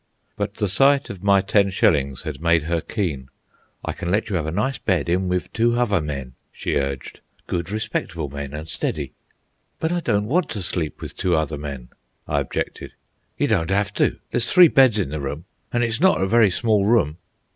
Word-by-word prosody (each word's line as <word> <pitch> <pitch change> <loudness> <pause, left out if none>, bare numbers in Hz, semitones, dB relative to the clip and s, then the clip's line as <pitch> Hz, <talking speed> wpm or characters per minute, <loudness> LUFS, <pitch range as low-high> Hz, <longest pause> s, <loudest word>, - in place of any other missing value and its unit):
But - - -3
the 105 - 0
sight 135 +8 +3
of 95 -3 -9
my 100 -1 +4
ten 100 +1 +2
shillings 70 -8 +1
had 75 -2 -6
made 85 -2 +3
her 85 +1 -1
keen. 75 - -3 0.6
"I - - -2
can 85 - -5
let 105 +4 0
you - - 0
have 80 -3 -1
a - - -1
nice 110 +10 -1
bed 90 -7 0
in 90 +2 +1
with 90 -1 -2
two 120 +1 +2
hother 105 -7 +2
men," 70 -4 -5 0.2
she - - -3
urged. 70 -1 -3 0.3
"Good, 85 0 -3
respectable 90 -7 -3
men, 70 0 -6
an' 75 +2 -6
steady." 75 -3 -3 0.7
"But 160 - -1
I 175 - +1
don't 105 -10 0
want 160 +8 +1
to 105 -4 -4
sleep 85 -2 -3
with - - -7
two 90 -2 +1
other 80 -1 -2
men," 70 -4 -7 0.4
I 75 - +1
objected. 70 - -4 0.4
"You - - +2
don't 80 +1 +1
'ave 100 +1 +1
to. - - +1
There's 120 0 +1
three 180 -2 +8
beds 130 -6 +5
in 95 -9 0
the 75 0 -4
room, 75 +5 -5 0.3
an' 120 0 +1
hit's 115 +3 -1
not 190 +1 +4
a 95 - +2
very 110 +1 +4
small 105 +1 +1
room." 100 -8 +2
90 Hz, 205 wpm, -22 LUFS, 75-110 Hz, 0.7 s, three